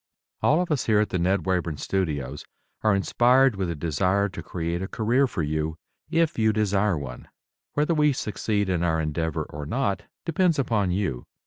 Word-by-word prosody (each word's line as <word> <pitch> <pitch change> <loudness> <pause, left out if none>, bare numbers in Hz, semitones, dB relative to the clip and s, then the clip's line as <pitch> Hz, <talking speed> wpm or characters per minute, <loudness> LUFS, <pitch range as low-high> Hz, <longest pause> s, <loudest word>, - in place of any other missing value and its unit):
All 155 - +4
of 180 -2 -1
us 150 - 0
here 110 -2 +4
at 105 - +1
the 90 - -1
Ned 95 +3 +1
Wayburn 90 -5 0
Studios 75 -7 -2 0.4
are 110 -2 +3
inspired 125 +5 +4
with 95 -2 -2
a 85 - -2
desire 90 +6 +1
to 90 - -7
create 85 0 -3
a 95 - -3
career 120 +7 +2
for 85 - -3
you, 80 +1 -2 0.3
if 165 -5 +1
you 110 0 +4
desire 105 -3 +1
one. 65 -4 -7 0.5
Whether 150 +3 +1
we 150 -2 +4
succeed 105 -4 -1
in 90 -3 0
our 80 -2 +1
endeavor 80 0 -1
or 75 -1 -7
not 120 - -1 0.2
depends 165 0 +2
upon 110 -8 +1
you. 90 -9 -2
95 Hz, 185 wpm, -25 LUFS, 80-120 Hz, 0.5 s, All